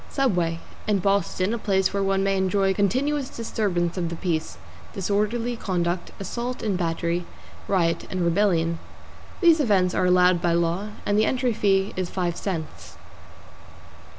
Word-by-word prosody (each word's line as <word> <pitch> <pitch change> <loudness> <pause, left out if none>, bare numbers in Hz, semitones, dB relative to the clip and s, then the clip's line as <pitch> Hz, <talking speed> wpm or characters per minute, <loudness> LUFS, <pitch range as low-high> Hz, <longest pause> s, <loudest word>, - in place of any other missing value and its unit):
=SUBWAY= 175 - 0 0.3
In 210 -1 +3
Boston, 195 +1 +1
a 235 - -2
place 190 -2 +1
where 200 - 0
one 195 0 +1
may 195 0 +1
enjoy 190 0 +2
continuous 260 +8 0
disturbance 195 -8 -2
of 170 -2 -1
the 170 - -4
peace, 165 -3 -2 0.4
disorderly 210 +5 -1
conduct, 175 -4 -2
assault 235 +6 -4
and 210 -4 0
battery, 170 0 -1 0.4
riot 170 -4 +1
and 185 - -2
rebellion. 170 -2 +2 0.6
These 335 -3 +6
events 195 -9 +2
are 180 - +2
allowed 180 -1 +4
by 175 -1 +2
law, 170 +4 0 0.2
and 205 +1 +2
the 215 - +4
entry 250 -1 +1
fee 195 -1 +1
is 185 -1 -2
five 175 -2 -2
cents. 170 -6 -5
190 Hz, 150 wpm, -24 LUFS, 175-210 Hz, 0.6 s, These